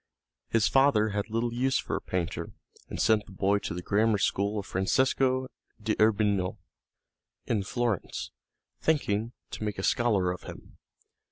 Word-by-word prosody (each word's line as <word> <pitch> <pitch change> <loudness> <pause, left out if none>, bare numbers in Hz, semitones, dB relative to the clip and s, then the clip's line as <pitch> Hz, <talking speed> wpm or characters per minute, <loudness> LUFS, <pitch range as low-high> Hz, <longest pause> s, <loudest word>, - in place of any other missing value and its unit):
His 115 -2 +3
father 135 -6 +4
had 105 +1 -2
little 115 +2 -1
use 130 +2 +1
for - - -2
a - - -3
painter, 90 -3 -3 0.4
and - - -5
sent 110 -2 +3
the - - -12
boy 100 +2 +1
to 85 - -4
the 90 - -5
grammar 110 +2 +2
school 100 +2 0
of 100 - -3
Francesco 130 +6 +1 0.3
d'Urbino, 105 -3 +2 0.9
in 110 -3 0
Florence, 115 -1 -2 0.5
thinking 115 -7 0 0.2
to - - -6
make 105 -1 -2
a 95 - -4
scholar 105 -8 +2
of 90 - -6
him. - - -11
105 Hz, 150 wpm, -28 LUFS, 100-120 Hz, 0.9 s, father